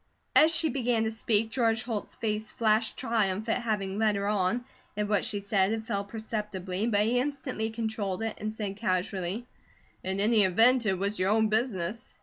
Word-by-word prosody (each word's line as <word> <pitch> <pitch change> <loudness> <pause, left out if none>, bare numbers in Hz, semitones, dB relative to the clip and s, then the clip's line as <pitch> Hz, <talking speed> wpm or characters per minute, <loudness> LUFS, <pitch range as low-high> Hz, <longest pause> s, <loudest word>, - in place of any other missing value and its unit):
As 315 +1 +7
she 325 -1 +3
began 240 -3 0
to 220 - -1
speak, 225 0 0
George 225 -2 +1
Holt's 225 -4 -4
face 215 -1 -2
flashed 220 0 +1
triumph 220 -4 0
at 230 +2 +1
having 205 -3 -2
led 215 -2 +3
her 200 0 -1
on; 210 +4 0 0.3
at 210 0 0
what 205 -2 +1
she 205 - -1
said 200 -1 +1
it 220 0 -4
fell 200 -2 -2
perceptibly, 210 -2 -4
but 205 -3 +2
he 235 +4 +2
instantly 260 -5 -2
controlled 220 -3 -3
it 225 -1 -2
and 215 +1 -3
said 205 -3 -5
casually: 190 +1 -2 0.6
"In 190 +1 -2
any 215 +1 +4
event, 230 +6 +4
it 190 -2 +1
was 200 +3 -2
your 185 +1 +2
own 220 +1 +3
business." 220 -1 -1
215 Hz, 185 wpm, -28 LUFS, 200-230 Hz, 0.6 s, As